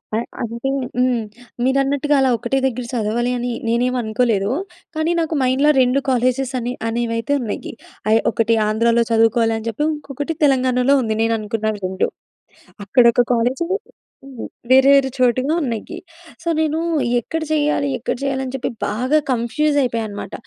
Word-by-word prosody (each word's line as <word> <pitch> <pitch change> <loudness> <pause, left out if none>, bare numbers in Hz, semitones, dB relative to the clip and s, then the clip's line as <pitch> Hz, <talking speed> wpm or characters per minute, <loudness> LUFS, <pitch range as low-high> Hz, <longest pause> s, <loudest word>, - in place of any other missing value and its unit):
ఆ! - - +2 0.2
అంటే 235 +2 -3 0.3
హ్మ్. 250 -2 +2 0.4
మీరన్నట్టుగా 275 +2 +1
అలా 265 -1 +3
ఒకటే 240 +5 -1
దగ్గర 250 -1 -2
సదవాలి 235 +2 0
అని 245 +1 -3 0.2
నేనేమి 245 +2 +1
అనుకోలేదూ. 220 -2 0 0.4
కానీ 315 +2 0
నాకు 325 -1 -1
మైండ్‌లో, 260 +3 +3
2 255 +2 +3
కాలేజెస్ 255 +1 +1
అనే 245 +1 -3
అనేవైతే 230 +2 -1
ఉన్నయి. 220 -4 -5 0.4
ఆహ్, 225 +1 +4
ఒకటి 230 0 +1
ఆంధ్రాలో 230 +2 +2
చదువుకోవాలి 225 0 +3
అని 225 - -7
చెప్పి. 230 +7 -2
ఇంకొకటి 290 +2 -5
తెలంగాణలో 260 -1 +3
ఉంది 220 -3 -1
నేను 225 0 +2
అనుకున్న 215 +1 -2
2. 185 0 0 0.8
అక్కడ 245 +5 +4
ఒక 245 - +3
కాలేజ్ 245 +6 0 0.6
హ్మ్. 265 -4 -8 0.2
వేరే, 265 +1 +7
వేరే 270 -1 +3
చోటుల్లో 255 +5 +2
ఉన్నయ్యీ. 245 +7 -4 0.5
సో, - - -9
నేనూ 315 0 0 0.4
ఎక్కడ 325 +7 -4
చెయ్యాలీ, 295 -2 +1
ఎక్కడ - - -2
చెయ్యాలి 275 -1 -1
అని 255 - -7
చెప్పి 265 0 -3 0.2
బాగా 255 +8 +1
కన్‌ఫ్యూజ్ 285 +5 0
అయిపోయా 230 -3 -1
అనమాట. 200 -1 -7
250 Hz, 150 wpm, -20 LUFS, 230-275 Hz, 0.8 s, వేరే